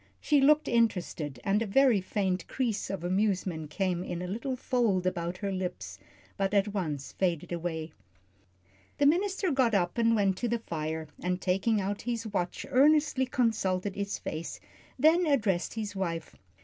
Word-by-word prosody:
She 295 -2 +3
looked 300 +2 +5
interested, 180 - 0
and 200 +2 +2
a 230 - -1
very 245 -1 +4
faint 185 -1 -1
crease 235 -6 -2
of 195 -3 -4
amusement 185 -4 0
came 180 +1 -1
in 175 -1 -4
a - - -4
little 235 +7 -3
fold 235 -8 +1
about 175 -1 -2
her 200 0 -3
lips, 180 - -4 0.4
but 195 +1 0
at 200 +1 +3
once 155 -8 -3
faded 175 -4 -1
away. 165 -2 -3 1.1
The 285 - +3
minister 375 +4 +2
got 255 -5 +2
up 180 +3 0
and 230 0 +4
went 195 -3 +2
to 240 - -1
the 235 - +1
fire, 160 -6 -4
and 180 0 -1
taking 195 +4 +1
out 200 +1 -2
his 235 -1 -3
watch 180 -5 -3
earnestly 290 -1 +4
consulted 205 -6 0
its 200 0 -3
face, 160 +2 -5 0.4
then 320 +5 +4
addressed 210 - +1
his 210 -2 -4
wife. 165 -4 -3
195 Hz, 160 wpm, -29 LUFS, 180-235 Hz, 1.1 s, looked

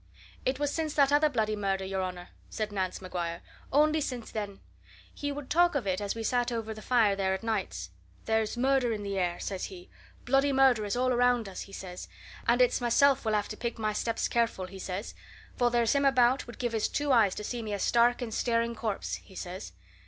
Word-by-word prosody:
"It 260 +1 +1
was 290 0 0
since 315 -2 -2
that 280 -1 +4
other 300 +1 +5
bloody 220 -5 0
murder, 195 -2 -1
your 190 0 -2
honour," 180 -1 -5 0.2
said 215 -1 -3
Nance 190 -1 -3
Maguire. 170 -2 -4 0.3
"Only 305 +2 +4
since 250 -5 -4
then. 205 -2 -4 0.5
He 285 0 -3
would 285 -1 -6
talk 345 0 +3
of 275 - 0
it 190 0 -1
as 205 +1 -2
we 225 - -4
sat 245 +2 +1
over 225 -1 -3
the 215 - -10
fire 225 -5 +3
there 190 -1 0
at 190 - -8
nights. 190 - -2 0.3
'There's 220 +1 0
murder 260 -1 +2
in 210 -1 -4
the 200 -1 -2
air,' 175 -1 -1
says 190 -2 -3
he. 365 -2 -11 0.3
'Bloody 270 +2 +3
murder 265 -5 +4
is 205 - -2
all 255 0 +2
around 245 -2 +3
us!' 195 - -7
he 195 - -9
says. 180 -2 -7 0.4
'And 245 +2 +5
it's 245 - +1
myself 270 +3 +4
will 220 - +1
have 210 -1 0
to 215 - -5
pick 235 0 -3
my 215 -1 -1
steps 230 +2 -1
careful,' 230 -5 0
he 190 +1 -10
says, 190 +3 -5 0.4
'for 245 -1 +3
there's 235 -1 +2
him 280 0 +2
about 255 -1 +3
would 240 - -10
give 240 -2 -2
his 220 -2 +1
two 290 -1 0
eyes 220 -7 +4
to 210 - -5
see 240 +2 -3
me 215 -2 -5
a 205 - -1
stark 240 +4 +3
and 225 -2 -5
staring 235 0 +1
corpse,' 220 -2 -3
he 190 - -17
says. 180 - -6
230 Hz, 225 wpm, -29 LUFS, 200-255 Hz, 0.5 s, other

